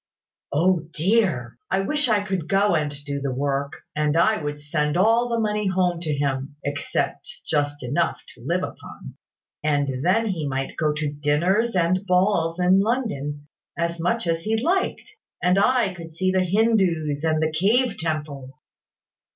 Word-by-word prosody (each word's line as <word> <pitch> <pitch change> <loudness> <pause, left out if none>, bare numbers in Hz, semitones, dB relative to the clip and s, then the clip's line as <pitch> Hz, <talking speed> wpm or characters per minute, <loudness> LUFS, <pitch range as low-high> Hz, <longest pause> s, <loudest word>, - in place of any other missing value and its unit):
"O 170 +1 +2
dear! 160 - +1
I 190 - +1
wish 295 +5 0
I 210 -2 +3
could 190 -5 -3
go 200 0 +3
and 150 -3 0
do 140 -1 -3
the 140 -1 -2
work; 140 +2 -1 0.2
and 150 +1 +1
I 215 +5 +3
would 145 0 -4
send 150 +1 -1
all 230 +5 +3
the 235 -1 0
money 210 -1 0
home 180 -2 +1
to 160 -3 -2
him 140 0 -2
(except 145 0 -2 0.2
just 145 -2 -1
enough 145 +8 0
to - - -17
live - - 0
upon), - - -8 0.5
and 145 -3 0
then 190 +7 +3
he 165 -6 -2
might 135 0 -3
go 155 -2 +1
to 150 -1 -3
dinners 175 +10 +1
and 180 +2 +2
balls 180 -2 +2
in 180 +2 +4
London, 195 - -2 0.3
as 170 0 -1
much 230 +7 0
as 165 -1 0
he 220 +5 0
liked, 370 - -1 0.3
and 180 +2 +4
I 235 -3 +3
could 165 -2 -10
see 185 +2 +1
the 185 0 +2
Hindoos 180 -7 +1
and 160 -1 +2
the 155 0 +1
cave 220 +8 +2
temples." 145 -5 -4
170 Hz, 165 wpm, -23 LUFS, 145-195 Hz, 0.5 s, in